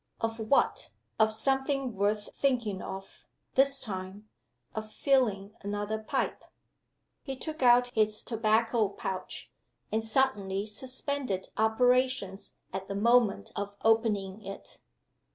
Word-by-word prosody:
Of 225 0 -2
what? 220 +5 +2 0.3
Of 220 0 +5
something 270 +1 0
worth 205 +1 0
thinking 235 -8 0
of, 195 0 -8 0.3
this 275 +1 +3
time 195 0 -4 0.4
of 215 0 -5
filling 215 -8 +1
another 205 +1 -2
pipe. 215 - -2 0.8
He 270 -2 -5
took 310 +3 -6
out 245 0 +6
his 215 -1 +1
tobacco 225 -1 +2
pouch; 190 -1 -5 0.4
and 220 +1 0
suddenly 210 -5 +1
suspended 255 -2 -3
operations 245 -2 +1 0.2
at 190 0 -4
the 200 - -4
moment 220 - +3
of 200 0 -4
opening 215 -3 +2
it. 195 0 -8
220 Hz, 115 wpm, -30 LUFS, 200-250 Hz, 0.8 s, out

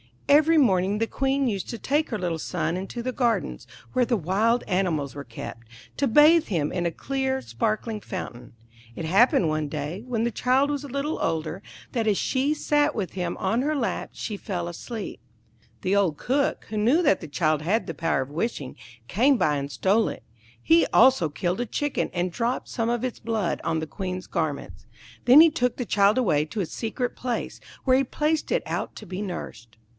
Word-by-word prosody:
Every 310 +3 +5
morning 195 -7 +3
the 225 - +2
Queen 270 +1 0
used 200 -5 -2
to 235 - -4
take 295 +7 0
her 220 - -2
little 175 -4 -2
son 165 - -2
into 195 +6 -5
the 255 - -1
gardens, 240 -3 -1 0.3
where 255 -1 +3
the 235 -1 +1
wild 210 +7 +1
animals 175 -7 0
were 140 0 -7
kept, 115 -1 -9 0.3
to 280 - +2
bathe 305 +7 +6
him 155 -6 -1
in 175 -1 -2
a 170 - +1
clear, 265 - -2
sparkling 220 -2 -2
fountain. 125 - -7 0.4
It 165 - -4
happened 190 0 +4
one 155 -1 -1
day, 150 +7 -5
when 230 -3 -1
the 235 - 0
child 260 +5 +2
was 290 0 -3
a - - -6
little 280 +4 -2
older, 160 +3 -2 0.3
that 230 -4 -1
as 205 -2 +3
she 275 +3 +1
sat 295 0 +1
with 200 -5 -2
him 180 -2 -3
on 225 +6 0
her 305 +3 0
lap 255 -5 -2
she 210 - -5
fell 180 -4 -4
asleep. 215 +5 -6 0.6
The 190 +2 +1
old 185 -7 +2
Cook, 275 +2 0
who 215 - -4
knew 250 +12 +3
that 195 - +4
the 160 - -7
child 155 0 +1
had 200 +9 0
the - - -5
power 165 -5 0
of 130 - -5
wishing, 150 - -3 0.3
came 260 +7 +4
by 150 -8 +2
and 140 0 -4
stole 205 +8 +2
it; - - -6 0.4
he 165 +6 +5
also 255 -10 +5
killed 175 +6 -2
a - - -1
Chicken, 290 +5 -1
and 180 0 -1
dropped 235 +6 -2
some 230 -2 -1
of 240 0 -1
its 255 -2 -3
blood 220 -5 -1
on 165 -1 0
the 160 - -3
Queen's 185 +2 -5
garments. 140 - -4 0.4
Then 260 +5 +9
he 330 -1 +7
took 250 -5 0
the 245 - -3
child 205 +1 +3
away 155 -12 +2
to 205 +6 -4
a - - -1
secret 240 - -3
place, 245 -2 -3 0.2
where 260 -1 +4
he 270 - +3
placed 305 +4 -1
it - - +1
out - - -3
to - - -9
be 185 +2 -5
nursed. 120 - -7
215 Hz, 200 wpm, -25 LUFS, 170-255 Hz, 0.6 s, Then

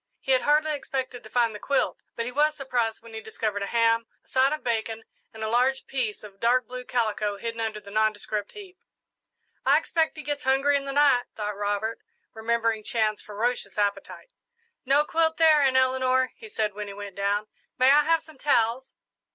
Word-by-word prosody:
He - - -2
had 260 -1 +4
hardly 305 +1 +2
expected 260 -3 -4
to 220 - -13
find 230 -1 +2
the 210 - -8
quilt, 280 - 0
but 230 - -2
he 245 - -4
was 300 +3 +2
surprised 240 -6 -2
when 230 -1 -13
he 220 - -6
discovered 215 -1 -3
a 200 - -2
ham, 230 0 +2 0.2
a - - -34
side 260 +1 +3
of 305 - -3
bacon, 225 -1 -2 0.3
and 220 0 -8
a - - -1
large 250 +4 +1
piece 245 -7 -3
of 200 -2 -12
dark 245 +2 +3
blue 250 +2 -7
calico 215 -4 -1
hidden 230 +2 -5
under 220 -1 -2
the 200 -1 -13
nondescript 215 -1 -1
heap. 385 -3 -12 0.8
"I - - +5
expect 320 -1 0
he 305 - -7
gets 290 +1 -3
hungry 270 +2 +3
in 280 0 -1
the 275 - -3
night," 280 -3 +4
thought 210 -1 -3
Robert, 205 +2 -2 0.3
remembering 225 -1 0
Chan's 215 -1 0
ferocious 215 -1 -3
appetite. 205 - -2 0.5
"No 280 +3 +3
quilt 320 0 +1
there, 315 -2 +6
Aunt 265 -2 +3
Eleanor," 260 0 +2
he 445 - -12
said, 215 - -1
when 210 +1 -6
he 200 - -7
went 200 -2 -8
down. 200 +1 0 0.3
"May 260 +1 +6
I 295 +1 +7
have 325 +2 +2
some 315 -4 -17
towels?" 250 -2 +1
235 Hz, 200 wpm, -26 LUFS, 215-275 Hz, 0.8 s, I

